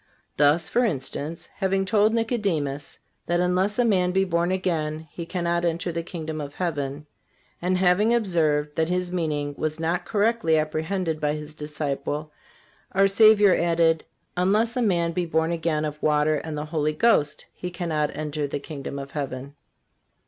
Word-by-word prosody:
Thus, 150 +3 +3
for 245 - +2
instance, 150 - -3
having 195 0 +1
told 210 +2 +3
Nicodemus 200 - -1 0.3
that 175 0 +1
unless 185 +3 +1
a 245 - +3
man 185 -5 +2
be 190 +1 +2
born 170 -1 0
again 160 -4 -1
he 170 -1 -7
cannot 170 -1 -1
enter 170 +1 -1
the 170 0 -2
kingdom 160 -2 -5
of 145 0 -7
heaven, 145 -4 -3 0.6
and 180 +1 +1
having 190 +4 +3
observed 155 -10 +1
that 160 0 +1
His 180 0 -1
meaning 150 -5 -1
was 155 0 -2
not 170 +2 -1
correctly 215 -6 +2
apprehended 160 +2 -1
by 150 0 +1
this 150 0 -8
disciple 150 0 -4 0.6
our 195 +1 +5
Savior 205 -1 +6
added: 165 -2 +2 0.3
"Unless 210 +6 +2
a 250 - +1
man 170 -6 +2
be 175 +1 -2
born 160 +1 +1
again 160 -2 0
of 150 0 -5
water 150 0 +2
and 155 0 -5
the 150 - -3
Holy 155 -1 -1
Ghost 155 -5 +2
he 180 - -5
cannot 160 -5 -2
enter 150 -1 -2
the 140 - -3
kingdom 140 -1 -7
of 140 0 -7
heaven." 140 -1 -5
165 Hz, 165 wpm, -25 LUFS, 150-185 Hz, 0.6 s, Savior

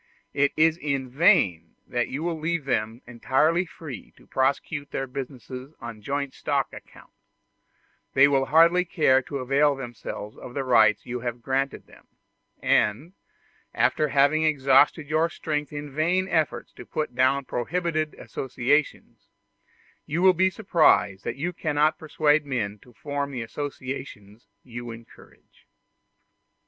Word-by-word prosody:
It 145 0 +2
is 160 +1 +4
in 140 -5 -3
vain 125 - +3
that 120 -1 -1
you 140 +4 -4
will 170 -2 -2
leave 160 -1 -2
them 115 -2 -2
entirely 140 +9 +1
free 145 -9 -9
to - - -20
prosecute 140 +2 -1
their 135 - -3
business 130 -1 -8 0.3
on 115 -3 -8
joint 140 +4 -3
stock - - -1
account: - - -14 1.0
they 135 +2 +7
will 135 -1 +1
hardly 170 +3 +5
care 150 -6 +3
to 140 +2 -6
avail 140 +3 +2
themselves 120 -4 -7
of 125 - -10
the 140 - -1
rights 110 -5 +4
you 125 0 -4
have 120 0 -5
granted 135 +1 -1
to - - -38
them; - - -19 0.6
and, 135 - +1 0.6
after 155 - +2
having 145 +2 +3
exhausted 145 0 +3
your 160 +2 +1
strength 150 -3 -3
in 145 -1 -7
vain 175 +5 +1
efforts 155 -9 -1
to - - -11
put 150 -5 -3
down 130 +2 +2
prohibited 155 +4 -2
associations, 135 +3 -2 0.8
you 165 +5 -1
will 190 -1 +7
be 190 +2 +3
surprised 160 - +2
that - - -3
you 170 +6 -3
cannot 155 -1 +1
persuade 155 -1 +2
men 110 -7 -3
to 125 - -19
form 145 +3 -4
the 125 -4 -4
associations 125 -5 -7 0.2
you 120 -1 -8
encourage. 115 0 -15
140 Hz, 140 wpm, -25 LUFS, 125-155 Hz, 1.0 s, they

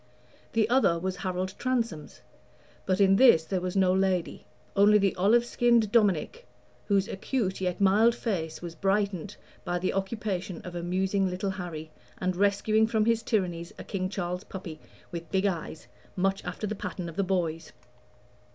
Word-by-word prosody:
The 220 -2 +3
other 220 -9 +3
was 185 +2 -3
Harold 185 0 -3
Transome's; 230 -12 -2 0.7
but 185 0 +1
in 195 -1 +5
this 220 -11 +6
there 185 +1 -2
was 180 +1 -3
no 185 -1 +4
lady 190 -2 0 0.3
only 205 +2 +6
the 195 -2 +1
olive 220 +6 +3
skinned 235 -3 +2
Dominic, 215 - +1 0.4
whose 200 -1 +2
acute 195 -2 -2
yet 180 -1 -1
mild 210 +4 +4
face 175 -10 -3
was 170 -1 -6
brightened 195 +1 -1 0.3
by 175 - -1
the 180 +1 -1
occupation 195 -2 -3
of 180 - -8
amusing 185 +3 0
little 190 +2 -2
Harry 170 -5 -6 0.3
and 185 0 -1
rescuing 205 +3 +2
from 220 -1 +1
his 230 0 +2
tyrannies 175 -7 -2
a - - -7
King 185 -2 -3
Charles 180 -1 -3
puppy, 175 -7 -8 0.3
with 170 -1 -6
big 190 0 +1
eyes, 170 -4 -3 0.3
much 195 +1 0
after - - -5
the 210 - -2
pattern 185 -3 -5
of 165 - -8
the 200 - +1
boy's. 170 -4 -2
190 Hz, 160 wpm, -28 LUFS, 180-210 Hz, 0.7 s, this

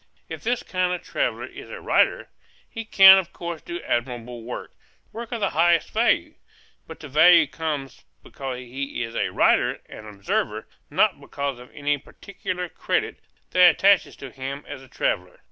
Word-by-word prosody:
If - - -7
this 240 +2 -1
kind 185 -1 -1
of 180 - -5
traveller - - -2
is - - -11
a - - -8
writer, - - +1 0.4
he 225 -1 -7
can 195 -3 +9
of 185 - -6
course 170 -1 -6
do 350 +1 -6
admirable 120 -1 -3
work, 120 +2 -7 0.4
work 230 +1 -8
of 235 -2 -4
the 200 - +1
highest 170 0 +2
value; 225 +2 +1 0.5
but - - -10
the 150 - -8
value 160 +4 +6
comes 150 -3 -5 0.2
because 135 -2 -6
he 125 +1 -5
is 115 -1 -7
a - - 0
writer - - +2
and 110 - -11
observer, 100 -2 -3 0.2
not - - +2
because 140 -3 -4
of 125 - -13
any 145 0 -1
particular 180 +3 -6
credit - - -2 0.3
that 180 0 +7
attaches 195 +4 +3
to 135 -2 -10
him 135 +2 -6
as - - -8
a 135 - -15
traveller. 90 -6 -2
150 Hz, 170 wpm, -24 LUFS, 130-185 Hz, 0.5 s, can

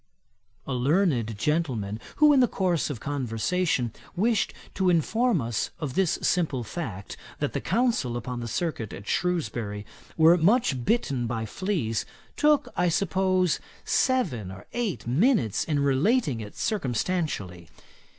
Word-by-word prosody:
A 135 - -3
learned 130 - +1
gentleman 120 -8 -1 0.2
who 300 -1 +6
in 275 - +5
the 250 - +5
course 180 -7 0
of 140 -6 -4
conversation 130 - -1 0.2
wished 220 +3 +1 0.2
to 190 -1 +1
inform 220 - +2
us 115 -4 -2
of 150 -5 -3
this 185 0 +2
simple 155 -8 +1
fact, 105 - -6 0.2
that - - -2
the - - -2
Counsel 230 - +1
upon 120 +1 -5
the 120 - -4
circuit 120 - -3
at 100 - -9
Shrewsbury 120 -13 -1 0.3
were 165 +2 +6
much 175 - +3
bitten 135 - 0
by 115 -1 -2
fleas, 130 - -2 0.3
took, 300 -1 +3
I 180 0 +2
suppose, 185 0 +1 0.3
seven 175 - +1
or 95 +1 -11
eight 235 -7 -2
minutes 145 - +2
in 150 -3 -1
relating 140 - +2
it 105 -1 -9
circumstantially. 130 - -2
155 Hz, 135 wpm, -26 LUFS, 115-190 Hz, 0.3 s, who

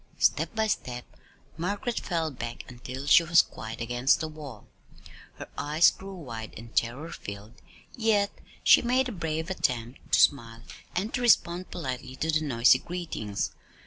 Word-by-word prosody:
Step - - +2
by 220 0 +2
step 125 - -3 0.5
Margaret 200 +7 -2
fell 165 -3 -2
back 120 -2 -6
until 125 +2 -7
she 145 - +7
was 170 0 +5
quite 110 +1 -8
against 120 +3 +2
the 160 - -2
wall. 155 -3 -10 0.7
Her - - -8
eyes 150 +3 +4
grew 195 0 -9
wide 115 -10 -7
and 115 +1 -12
terror 135 +8 -1
filled, 105 -4 -9 0.3
yet 215 -4 +2 0.3
she - - +7
made 255 +2 +1
a - - -4
brave 165 -2 -3
attempt 120 -8 -2
to - - +6
smile 115 -4 +2 0.3
and 200 +5 -1
to 250 - -1
respond 185 -6 +3
politely 130 -5 -5
to 160 +5 -1
the 155 0 +2
noisy 125 -5 +4
greetings. 165 - -4
155 Hz, 155 wpm, -28 LUFS, 120-180 Hz, 0.7 s, she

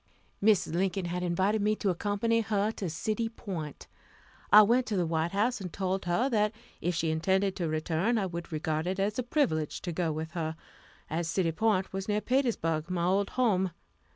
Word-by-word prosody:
Mrs. 205 -6 +3
Lincoln 185 +1 0
had 175 +1 -2
invited 190 +5 +1
me 210 +1 +2
to 200 -2 0
accompany 205 +5 0
her 210 -1 0
to 195 -5 -4
City 215 +8 -2
Point. 175 - -6 0.7
I 210 +1 +10
went 240 +4 +3
to 210 - -1
the 180 - +2
White 160 0 0
House, 220 +3 +1
and 180 -3 -5
told 190 0 -2
her 175 +9 +2
that 210 -1 +2 0.3
if 175 0 0
she 160 -1 0
intended 190 +4 +1
to 175 -3 -1
return, 160 +8 0
I 200 - +1
would 170 -2 -6
regard 155 +1 -1
it 190 +1 -2
as 205 +4 0
a - - +3
privilege 235 - 0
to 175 - -3
go 165 -1 -1
with 155 +1 -4
her, 160 -2 -3 0.5
as 165 +2 -2
City 170 -1 +1
Point 200 +1 +1
was 195 0 -3
near 210 0 +1
Petersburg, 210 - 0
my 175 -2 -1
old 195 +2 +2
home. 195 -7 +3
190 Hz, 195 wpm, -29 LUFS, 170-210 Hz, 0.7 s, I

